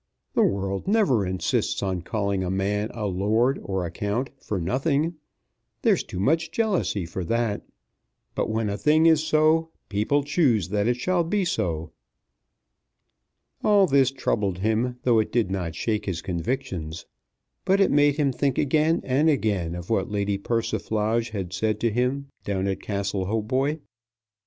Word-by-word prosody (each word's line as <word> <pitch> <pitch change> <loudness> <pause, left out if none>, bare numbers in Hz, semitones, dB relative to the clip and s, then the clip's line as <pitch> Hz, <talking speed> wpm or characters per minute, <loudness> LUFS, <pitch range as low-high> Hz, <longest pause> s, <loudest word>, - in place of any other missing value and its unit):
The - - +3
world 95 - 0
never 155 - +3
insists 95 +2 -1
on 95 -2 -1
calling 100 0 -1
a 90 - -2
man 100 +3 -1
a 110 -3 -4
Lord 110 +7 +1
or 95 -2 -2
a 85 - -5
Count 105 +9 -2
for 100 - -2
nothing. 140 - 0 0.7
There's - - +3
too 90 - -7
much 160 - +1
jealousy 190 - 0
for 85 +3 -5
that. 115 0 0 0.7
But - - -1
when 110 0 0
a 100 0 -3
thing 155 +2 +4
is 160 -2 +5
so, 160 +1 +3 0.2
people 110 +8 +1
choose 135 - +2
that 105 +1 0
it 120 0 +1
shall 175 +6 +1
be 195 +3 0
so." 85 - -2 1.7
All 205 -2 +5
this 135 -5 +4
troubled 105 -8 -1
him, 110 +5 0
though 120 -3 +4
it 110 - -1
did 115 -6 +1
not 90 -4 -3
shake 105 0 -2
his 90 -4 -3
convictions. 85 -3 -3 0.6
But 195 +1 +3
it 195 - +4
made 145 0 +4
him 145 -3 +1
think 135 0 0
again 155 +3 +2
and 140 +5 +2
again 100 - 0
of 90 +4 -7
what 100 -4 +1
Lady 100 -1 -1
Persiflage 115 +1 -1
had 95 -4 -5
said 110 +2 0
to 115 0 +1
him 125 +5 0 0.2
down 95 -1 -1
at 95 - -2
Castle 100 -1 -2
Hautboy. 130 +8 0
110 Hz, 160 wpm, -25 LUFS, 95-140 Hz, 1.7 s, is